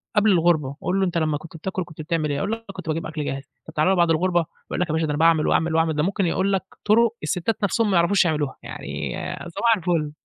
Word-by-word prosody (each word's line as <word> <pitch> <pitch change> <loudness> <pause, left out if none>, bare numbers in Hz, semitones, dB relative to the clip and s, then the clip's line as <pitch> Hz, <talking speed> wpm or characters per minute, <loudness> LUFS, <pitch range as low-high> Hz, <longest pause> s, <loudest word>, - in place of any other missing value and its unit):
قبل 210 0 +5
الغربة، 160 -6 +2
قُل 190 +2 0
له: 190 - +3
"أنت 175 -2 -1
لمّا 155 -2 +1
كنت 160 +2 -11
بتاكل 185 +3 -3
كنت 165 -2 -10
بتعمل 155 -1 -1
إيه؟" 145 - -1
هيقول 200 - -1
لك: 225 0 -3
"كنت 185 -3 -9
باجيب 160 +1 -1
أكل 155 -2 -4
جاهز." 135 0 -3 0.2
طَب - - -10
تعالَ 155 +2 +2
له 190 - +4
بعد 170 -2 +3
الغربة، 175 0 +2 0.3
يقول - - -2
لك: 180 - +1
"يا 155 - 0
باشا 160 - +1
ده 150 - -3
أنا 145 - -2
باعمل، 165 -1 +4
وأعمل، 160 0 +2
وأعمل." 160 -1 +2
ده 150 - +1
ممكن 195 +1 0
يقول 190 +3 +1
لك 190 - +1 0.2
طرق 230 +2 +4
الستات 180 +7 -1
نَفْسُهم 210 +2 +2
ما 190 - +2
يعرفوش 180 +2 +4
يعملوها، 150 -4 0
يعني - - -5 0.4
صباح 230 +6 +2
الفُل. 165 -4 0
170 Hz, 260 wpm, -23 LUFS, 155-190 Hz, 0.4 s, قبل